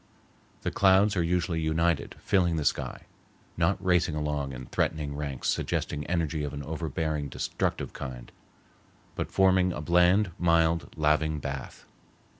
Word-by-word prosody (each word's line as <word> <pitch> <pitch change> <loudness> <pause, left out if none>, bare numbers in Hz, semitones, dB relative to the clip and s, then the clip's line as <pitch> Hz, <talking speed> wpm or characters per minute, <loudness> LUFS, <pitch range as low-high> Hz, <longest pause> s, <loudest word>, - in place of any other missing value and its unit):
The - - -1
clouds 100 +2 +4
are 90 - +2
usually 85 -1 0
united, 80 -1 0
filling 90 -4 +2
the 75 -2 -2
sky, - - -1 0.5
not 85 +3 +2
racing 90 -4 +2
along 75 -2 -2
in 65 -1 -7
threatening 75 +2 -1
ranks 70 -3 -4
suggesting 75 0 -1
energy 80 -3 -1
of 75 0 -4
an 70 - -5
overbearing 80 -1 -3
destructive - - -2
kind, 65 -3 -7 0.8
but - - -3
forming 95 -1 +4
a 85 - -5
bland, 90 +5 +3
mild, 85 -1 +2
laving 75 0 +2
bath. 70 -2 -6
80 Hz, 135 wpm, -28 LUFS, 75-90 Hz, 0.8 s, clouds